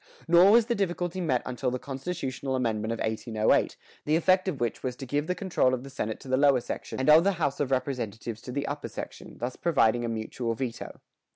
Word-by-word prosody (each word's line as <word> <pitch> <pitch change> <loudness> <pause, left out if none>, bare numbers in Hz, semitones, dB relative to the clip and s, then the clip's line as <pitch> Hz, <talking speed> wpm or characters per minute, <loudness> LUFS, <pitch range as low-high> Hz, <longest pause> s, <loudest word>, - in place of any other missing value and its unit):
Nor 175 +3 +7
was 230 +2 +6
the 235 - 0
difficulty 180 -3 -2
met 130 -8 +1
until 125 +1 -2
the 125 - -2
constitutional 135 -1 -4
amendment 110 -3 -1
of 115 - -2
1808, 110 0 +1 0.3
the 150 - +2
effect 185 +3 +3
of 160 -8 -2
which 120 -2 -2
was 125 -1 -3
to 135 - -7
give 145 +4 -1
the 180 - 0
control 170 -10 +1
of 125 - -8
the 135 - -10
senate 110 -4 -3
to - - -12
the 130 0 +2
lower 140 -2 +5
section 120 - -6
and 130 - -1
of 155 +2 +8
the 200 +1 +2
house 155 -6 -1
of 145 - 0
representatives 120 -4 -3
to 125 - -8
the 140 +2 -2
upper 145 +1 -4
section, - - -8
thus 125 +2 -4
providing 120 -8 +2
a 120 - -2
mutual 115 +1 -3
veto. 120 -1 -5
130 Hz, 220 wpm, -28 LUFS, 120-165 Hz, 0.3 s, of